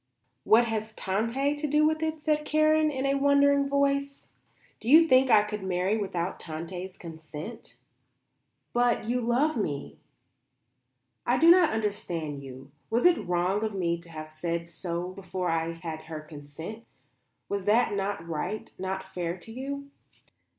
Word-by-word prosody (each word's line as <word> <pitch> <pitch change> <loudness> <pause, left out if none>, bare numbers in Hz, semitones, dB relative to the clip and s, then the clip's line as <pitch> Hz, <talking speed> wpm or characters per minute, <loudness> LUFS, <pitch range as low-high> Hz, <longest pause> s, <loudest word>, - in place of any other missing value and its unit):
"What 230 +2 +6
has 220 -1 -3
Tante 230 +9 0
to 300 +1 -2
do 300 +1 +3
with 315 0 +1
it?" 315 0 -1
said 300 0 +1
Karen 310 0 +3
in 270 -2 -2
a 275 - +2
wondering 280 0 +4
voice. 280 0 0 0.5
"Do 225 - -5
you 325 +4 +8
think 260 -2 +5
I 215 -3 +6
could 210 -1 -5
marry 190 +2 0
without 190 -4 -3
Tante's 175 +3 -6
consent?" 160 +5 -9 1.0
"But 240 -2 +2
you 245 +1 0
love 250 +6 +1
me?" 145 -10 -3 1.3
"I - - +3
do 335 +1 +7
not 350 -2 +6
understand 175 -9 -3
you. 135 0 -11 0.2
Was 235 +6 +1
it 335 - +4
wrong 180 +4 +1
of 215 -2 -2
me 170 -3 0
to 170 0 -16
have 155 -1 -7
said 170 +2 -3
so 170 +1 -4
before 185 -1 -4
I 165 0 0
had 165 -2 -7
her 160 -1 -6
consent? 155 +9 -9 0.6
Was 200 -2 -3
that 215 +2 +3
not 195 -4 -2
right? 175 +6 -4
Not 190 0 -4
fair 175 -1 -3
to 205 +5 -13
you?" 280 +3 -6
205 Hz, 155 wpm, -28 LUFS, 170-275 Hz, 1.3 s, you